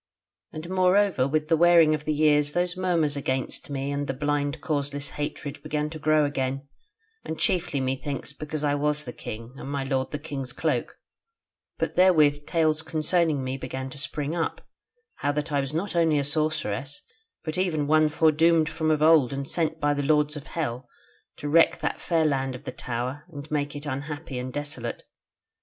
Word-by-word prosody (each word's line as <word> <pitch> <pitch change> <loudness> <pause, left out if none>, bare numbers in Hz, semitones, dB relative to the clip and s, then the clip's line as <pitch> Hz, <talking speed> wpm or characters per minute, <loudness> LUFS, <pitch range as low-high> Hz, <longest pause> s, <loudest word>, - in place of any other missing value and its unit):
And 155 +2 -7
moreover 185 -5 +3
with 155 +2 0
the 165 - +4
wearing 165 -1 +6
of 150 -1 -3
the 155 - +1
years 150 -1 +3
those 175 +1 0
murmurs 170 -5 +1
against 130 -1 -2
me 140 0 -2
and 145 0 -2
the 135 - -2
blind 145 +1 -1
causeless 145 -1 -2
hatred 145 -1 -5
began 150 0 -2
to 160 - -7
grow 155 0 +3
again, 135 -1 -2 0.6
and 160 - -5
chiefly 165 -5 0
methinks 135 +1 -3
because 150 +1 -5
I 145 -1 +2
was 150 +1 +1
the 120 - -6
king, 115 +3 -8
and 135 - -7
my 140 -1 -2
lord 135 -1 -1
the 150 - -3
king's 140 -4 -6
cloak: - - -1 0.8
but - - -2
therewith 155 -5 +4
tales 155 -2 +2
concerning 160 -2 +1
me 130 +1 -3
began 130 0 -5
to 140 - -6
spring 145 +1 -2
up, 165 - -2 0.6
how 145 - 0
that 150 +2 -3
I 145 - +2
was 135 0 -2
not 170 +5 -3
only 165 -3 +3
a 140 - +1
sorceress, 140 -3 -1 0.4
but 155 +3 -3
even 160 -6 +1
one 155 +1 +4
foredoomed 160 +1 +3
from 160 -1 -1
of 155 -1 +2
old 155 -6 +6
and 140 0 -4
sent 160 0 -1
by 145 -1 +2
the 145 - -1
lords 150 +1 +2
of 150 0 -8
hell 125 -6 -4 0.5
to 145 - -5
wreck 165 +3 +4
that - - -2
fair 165 -2 +1
Land 135 -3 0
of 125 - -10
the - - -5
Tower 125 +4 -4
and 145 0 -9
make 145 -1 -1
it 145 +1 -6
unhappy 145 0 -4
and 130 +1 -5
desolate. 145 -4 -4
150 Hz, 185 wpm, -26 LUFS, 140-155 Hz, 0.8 s, wearing